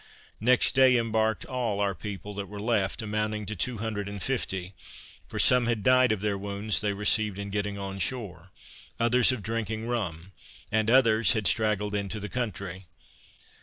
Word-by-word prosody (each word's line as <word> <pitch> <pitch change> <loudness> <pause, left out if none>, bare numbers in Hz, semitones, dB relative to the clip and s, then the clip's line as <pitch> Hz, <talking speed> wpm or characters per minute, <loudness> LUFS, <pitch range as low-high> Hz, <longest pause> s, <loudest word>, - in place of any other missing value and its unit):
Next 125 +4 +3
day 130 -1 +6
embarked 110 -1 0
all 120 -6 -2
our 100 -1 +1
people 105 +1 -7
that 100 0 -5
were 105 0 -8
left, 110 0 0
amounting 105 0 -2
to 110 - -4
two 120 +5 -1
hundred 105 -2 -3
and 100 0 -6
fifty; 95 -6 -3 0.5
for - - -7
some 125 -2 +4
had 115 -4 -1
died 130 -1 +5
of 105 -3 -1
their 100 -2 -1
wounds 100 +1 0
they 105 -1 0
received 105 0 +1
in 100 0 -5
getting 105 0 -2
on 95 0 -5
shore; 95 -5 -4 0.5
others 120 +2 +4
of 125 -5 -4
drinking 110 0 -3
rum, 95 -7 -3 0.4
and 110 +1 +1
others 115 -3 +4
had 110 -3 -2
straggled 105 0 +1
into 100 +1 -3
the 105 0 -6
country. 100 -6 -5
105 Hz, 170 wpm, -27 LUFS, 100-115 Hz, 0.5 s, day